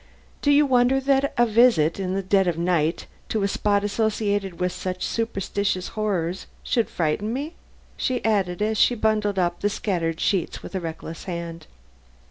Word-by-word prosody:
Do 285 - +1
you 290 +1 +6
wonder 255 0 +3
that 275 +1 +2
a 240 - +5
visit 220 -8 +4
in 185 -1 -2
the 195 - -1
dead 190 0 +3
of 170 -2 0
night 170 -1 0 0.2
to 215 -2 0
a - - +3
spot 205 0 +1
associated 205 -3 -1
with 180 0 0
such 185 0 -4
superstitious 200 -4 -2
horrors 190 -5 -2 0.2
should 230 -5 0
frighten 175 +6 -1
me?" 285 +7 -4 0.4
she 250 -3 -1
added 200 -3 +1
as 215 0 0
she 245 - +4
bundled 215 -2 +1
up 175 -1 0
the 205 - +1
scattered 170 -6 -2
sheets 190 -4 -1
with - - -9
a 190 - -1
reckless 165 -1 -7
hand. 170 -2 -6
200 Hz, 170 wpm, -24 LUFS, 175-220 Hz, 0.4 s, you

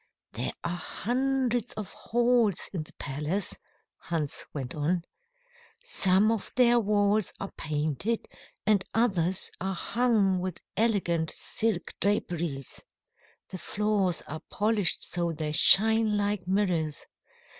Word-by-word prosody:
"There - - -3
are 175 +1 -2
hundreds 250 +3 -1
of 215 -3 -6
halls 235 -4 +1
in 175 - -2
the 155 - -12
palace," 150 +8 -1 0.4
Hans 160 -4 -4
went 130 -4 -5
on. 165 +4 0 0.8
"Some 200 - +3
of 225 -3 -3
their 240 -1 +5
walls 205 -1 +2
are 195 - -5
painted 155 - -2 0.4
and 200 -2 +3
others 190 -6 +2
are 190 +1 -2
hung 215 -3 +1
with 185 -1 -4 0.2
elegant 180 -8 +1
silk 225 -1 -1
draperies. 170 -9 -2 0.7
The 185 - -7
floors 200 -1 0
are 155 +1 -7
polished 210 -2 +1
so 170 -1 -1
they 155 -1 -3
shine 215 +6 +5
like 205 -3 -1
mirrors. 180 -6 0
195 Hz, 115 wpm, -28 LUFS, 170-220 Hz, 0.8 s, their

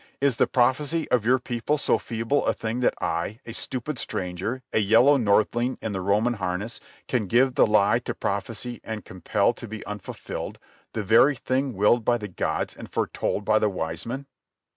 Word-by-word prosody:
Is 135 -4 +2
the - - +3
prophecy 145 +6 +1
of 115 -3 +2
your 130 +1 +5
people 125 +4 -1
so - - +1
feeble 115 +5 -1
a - - +2
thing 115 +2 -3
that 125 - +2
I, 85 +7 -2
a 115 - -7
stupid 130 +3 -3
stranger, 95 +8 -3
a - - +3
yellow 115 +7 +5
northling 120 +1 +2
in 110 - -4
the 95 -2 -3
Roman 105 +6 +2
harness, 100 +2 -3 0.3
can 120 -6 0
give 125 +5 +3
the - - +4
lie 105 +2 +4
to - - -5
prophecy 115 +5 -3
and 110 -2 -6
compel 100 +4 0
to 120 - -9
be 110 0 -7
unfulfilled—the 105 +1 -7
very 115 +8 +5
thing 130 +1 -1
willed 105 +4 +3
by 120 +2 +2
the 105 -3 -6
gods 95 - -2
and - - -10
foretold 100 - -1
by 110 - +4
the 105 - +2
wise 80 -1 -4
men?" 135 +4 -4
115 Hz, 185 wpm, -25 LUFS, 105-125 Hz, 0.3 s, your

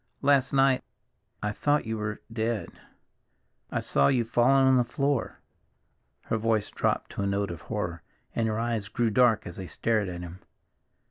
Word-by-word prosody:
Last 140 -2 +4
night 135 -1 +3 0.6
I 105 - 0
thought 145 +6 +1
you 110 0 -3
were—dead. 110 +1 -3 1.0
I - - -1
saw 70 0 +2
you 120 -3 +2
fallen 130 +4 +4
on 130 -1 +5
the 125 - +4
floor." 140 +1 -1 0.8
Her 115 - -1
voice 110 -1 0
dropped - - -1
to - - -4
a 100 - 0
note 100 -1 -1
of 85 - -7
horror, 85 -2 -3 0.3
and 115 -1 0
her 110 -1 -1
eyes 115 -3 -1
grew 115 +1 0
dark 115 0 +4
as 85 - -8
they 95 -2 -6
stared 110 -2 0
at 90 -1 -6
him. 90 +1 -8
115 Hz, 170 wpm, -27 LUFS, 100-125 Hz, 1.0 s, on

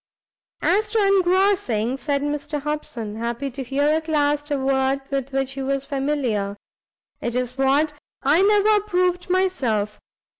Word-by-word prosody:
"As 420 +4 +2
to 450 - -1
engrossing," 370 - +2
said 280 0 -1
Mr 295 0 -2
Hobson, 255 -7 -4
happy 235 +4 -3
to 270 +2 -6
hear 270 +3 -1
at 315 +2 +1
last 295 -1 +1
a 290 - 0
word 265 0 +1
with 275 -1 -1
which 270 0 -1
he 270 0 -5
was 275 0 -1
familiar, 270 -9 -1 0.6
"it's 250 +1 -2
what 280 +3 +2 0.3
I 295 +6 +4
never 420 +1 +4
approved 365 -3 0
myself. 255 - 0
280 Hz, 140 wpm, -23 LUFS, 265-350 Hz, 0.6 s, I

